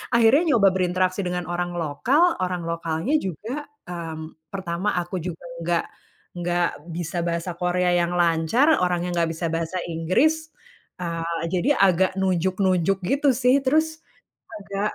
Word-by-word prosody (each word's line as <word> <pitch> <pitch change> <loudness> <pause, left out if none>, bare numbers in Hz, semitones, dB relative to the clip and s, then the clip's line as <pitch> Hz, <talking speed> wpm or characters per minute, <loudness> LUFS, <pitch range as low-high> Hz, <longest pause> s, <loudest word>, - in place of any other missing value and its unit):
akhirnya 235 +5 +6 0.2
nyoba 200 -3 +6
berinteraksi 185 +1 0
dengan 180 -1 -2
orang 175 +1 -3
lokal 170 - +1 0.2
orang 180 -2 -2
lokalnya 165 - -2
juga, 225 - -5 0.2
mmm, 160 -2 -8
pertama 185 +2 -2
aku 175 +1 -2
juga 170 0 -6 0.2
nggak 170 0 0 0.5
nggak 175 0 +1 0.2
bisa 170 0 -3
bahasa 170 +1 -2
Korea 180 0 +1
yang 175 0 +1
lancar 175 - +3
orangnya 180 0 0
nggak 165 -1 +2
bisa 165 +1 -3
bahasa 165 +2 -2
Inggris, 275 - +1 0.5
eee, 170 -1 -3 0.2
jadi 185 +9 +1
agak 190 -1 +4
nunjuk-nunjuk 185 0 +1
gitu 275 +10 +2
sih 250 +2 +3
terus, 315 +3 +2 0.6
agak 200 0 -3
180 Hz, 135 wpm, -24 LUFS, 170-195 Hz, 0.6 s, akhirnya